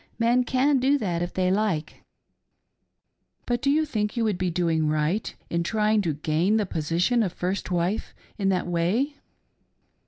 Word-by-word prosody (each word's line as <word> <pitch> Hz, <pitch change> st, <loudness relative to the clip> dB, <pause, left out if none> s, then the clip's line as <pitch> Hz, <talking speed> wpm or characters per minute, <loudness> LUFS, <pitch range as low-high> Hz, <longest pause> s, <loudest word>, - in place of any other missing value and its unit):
Men 240 Hz, +2 st, +2 dB
can 265 Hz, +3 st, +2 dB
do 275 Hz, +3 st, +3 dB
that 180 Hz, -9 st, -2 dB
if 175 Hz, -, -2 dB
they 185 Hz, -1 st, 0 dB
like." 190 Hz, -7 st, -1 dB, 0.7 s
" -, -, -49 dB
But 240 Hz, -1 st, -1 dB
do 275 Hz, -, +1 dB
you 310 Hz, +2 st, +3 dB
think 215 Hz, -5 st, -2 dB
you 230 Hz, -, +1 dB
would 210 Hz, -5 st, 0 dB
be 185 Hz, -1 st, 0 dB
doing 165 Hz, -2 st, +1 dB
right 155 Hz, +7 st, 0 dB, 0.2 s
in 170 Hz, -, +1 dB
trying 215 Hz, +3 st, +1 dB
to 165 Hz, -6 st, -1 dB
gain 160 Hz, +8 st, +1 dB
the 210 Hz, -, +1 dB
position 175 Hz, +8 st, 0 dB
of 195 Hz, -5 st, 0 dB
first 185 Hz, +2 st, -3 dB
wife 180 Hz, +4 st, -1 dB, 0.2 s
in 195 Hz, -3 st, 0 dB
that 185 Hz, -2 st, 0 dB
way 190 Hz, -, 0 dB
195 Hz, 175 wpm, -25 LUFS, 170-230 Hz, 0.7 s, do